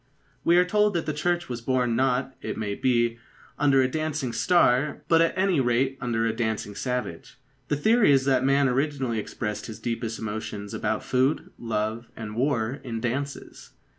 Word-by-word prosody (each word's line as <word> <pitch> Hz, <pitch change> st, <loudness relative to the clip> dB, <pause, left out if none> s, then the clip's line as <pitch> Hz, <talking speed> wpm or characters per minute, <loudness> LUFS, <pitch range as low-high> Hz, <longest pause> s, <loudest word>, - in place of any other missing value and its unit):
We 170 Hz, +1 st, +4 dB
are 180 Hz, -, +5 dB
told 210 Hz, +1 st, +2 dB
that 165 Hz, -, 0 dB
the 155 Hz, -, -2 dB
Church 175 Hz, +3 st, -1 dB
was 120 Hz, -2 st, -5 dB
born 125 Hz, -1 st, +1 dB
not, 130 Hz, +1 st, +1 dB
it -, -, -4 dB
may 105 Hz, -2 st, -2 dB
be, 120 Hz, 0 st, +1 dB, 0.4 s
under 135 Hz, -2 st, +4 dB
a -, -, +2 dB
dancing 155 Hz, -3 st, -2 dB
star, 135 Hz, +1 st, +2 dB
but 165 Hz, -1 st, +5 dB
at 165 Hz, +2 st, +1 dB
any 190 Hz, -4 st, +2 dB
rate 130 Hz, +2 st, +1 dB
under 115 Hz, -3 st, 0 dB
a 115 Hz, -, +1 dB
dancing 110 Hz, -3 st, -2 dB
savage. 125 Hz, -7 st, -4 dB, 0.3 s
The 145 Hz, -, +1 dB
theory 220 Hz, +4 st, +4 dB
is 135 Hz, -1 st, +4 dB
that 130 Hz, -2 st, +3 dB
man 140 Hz, +1 st, +3 dB
originally 135 Hz, -3 st, 0 dB
expressed 105 Hz, 0 st, -4 dB
his 110 Hz, -, -7 dB
deepest 115 Hz, -1 st, -3 dB
emotions 105 Hz, -1 st, -5 dB
about 110 Hz, 0 st, -1 dB
food, 130 Hz, +3 st, 0 dB
love, 110 Hz, 0 st, -2 dB
and 110 Hz, -1 st, -7 dB
war 125 Hz, 0 st, 0 dB
in 115 Hz, -3 st, -4 dB
dances. 140 Hz, +5 st, -5 dB
125 Hz, 175 wpm, -26 LUFS, 115-145 Hz, 0.4 s, are